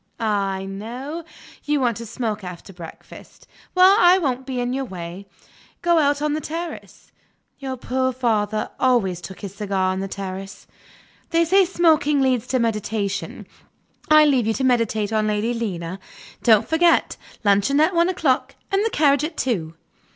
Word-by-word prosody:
Ah, 205 Hz, -3 st, 0 dB
I 190 Hz, 0 st, -5 dB
know! 245 Hz, +11 st, -6 dB, 0.4 s
You 295 Hz, 0 st, 0 dB
want 240 Hz, -5 st, 0 dB
to 230 Hz, -, -7 dB
smoke 215 Hz, -2 st, -3 dB
after 180 Hz, +2 st, -9 dB
breakfast. 170 Hz, -2 st, -13 dB, 0.3 s
Well, 370 Hz, +2 st, +7 dB
I 355 Hz, -1 st, +6 dB
won't 265 Hz, -6 st, -2 dB
be 255 Hz, -2 st, -3 dB
in 245 Hz, 0 st, -1 dB
your 270 Hz, +1 st, -2 dB
way. 185 Hz, -3 st, -8 dB, 0.6 s
Go 345 Hz, -1 st, +4 dB
out 290 Hz, -1 st, +1 dB
on 300 Hz, -1 st, 0 dB
the 310 Hz, -, -2 dB
terrace; 330 Hz, +2 st, -7 dB, 0.5 s
your 265 Hz, -2 st, -5 dB
poor 260 Hz, +1 st, -1 dB
father 215 Hz, -4 st, -1 dB
always 220 Hz, -9 st, +1 dB
took 190 Hz, +2 st, -10 dB
his 195 Hz, -2 st, -7 dB
cigar 195 Hz, -2 st, -1 dB
on 190 Hz, -, -3 dB
the 195 Hz, -, -3 dB
terrace. 195 Hz, 0 st, -7 dB, 0.6 s
They 335 Hz, 0 st, +2 dB
say 380 Hz, +3 st, +4 dB
smoking 320 Hz, -5 st, +2 dB
leads 255 Hz, -3 st, +1 dB
to 260 Hz, -, 0 dB
meditation; 215 Hz, -3 st, -2 dB, 0.6 s
I 305 Hz, 0 st, +7 dB
leave 260 Hz, -6 st, +2 dB
you 225 Hz, -, +2 dB
to 270 Hz, -, -2 dB
meditate 225 Hz, -4 st, +1 dB
on 215 Hz, -1 st, +1 dB
Lady 215 Hz, +3 st, 0 dB
Lena. 190 Hz, -6 st, -4 dB, 0.4 s
Don't 220 Hz, -3 st, +4 dB
forget 335 Hz, +1 st, +3 dB, 0.3 s
luncheon 205 Hz, +7 st, +3 dB
at 315 Hz, +5 st, +3 dB
one 340 Hz, +1 st, +3 dB
o'clock, 315 Hz, -8 st, 0 dB, 0.2 s
and 395 Hz, +1 st, +2 dB
the 450 Hz, -, +1 dB
carriage 285 Hz, -, +3 dB
at 315 Hz, +1 st, -4 dB
two." 170 Hz, -11 st, -2 dB
245 Hz, 165 wpm, -22 LUFS, 200-295 Hz, 0.6 s, Well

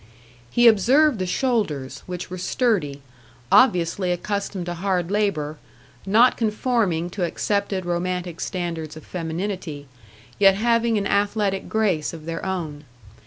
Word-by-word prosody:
He 240 Hz, -, +4 dB
observed 250 Hz, +5 st, +4 dB
the 185 Hz, -, -1 dB
shoulders, 180 Hz, -, -1 dB
which 180 Hz, 0 st, -6 dB
were 185 Hz, -, -5 dB
sturdy, 180 Hz, -, 0 dB, 0.5 s
obviously 180 Hz, -6 st, +4 dB
accustomed 200 Hz, 0 st, -3 dB
to 175 Hz, -, -3 dB
hard 180 Hz, 0 st, -1 dB
labour; 165 Hz, -8 st, -1 dB, 0.5 s
not 230 Hz, +6 st, +5 dB
conforming 210 Hz, -6 st, 0 dB
to 190 Hz, 0 st, -3 dB
accepted 200 Hz, +2 st, -1 dB
romantic 175 Hz, 0 st, -2 dB
standards 165 Hz, -4 st, -4 dB
of 155 Hz, -, -12 dB
femininity, 165 Hz, -3 st, -4 dB, 0.5 s
yet 195 Hz, -1 st, +6 dB
having 230 Hz, +1 st, +2 dB
an 200 Hz, -, -1 dB
athletic 200 Hz, -1 st, 0 dB
grace 195 Hz, -9 st, 0 dB
of 160 Hz, -2 st, -9 dB
their 165 Hz, 0 st, -4 dB
own. 165 Hz, -6 st, -4 dB
185 Hz, 125 wpm, -23 LUFS, 170-210 Hz, 0.5 s, yet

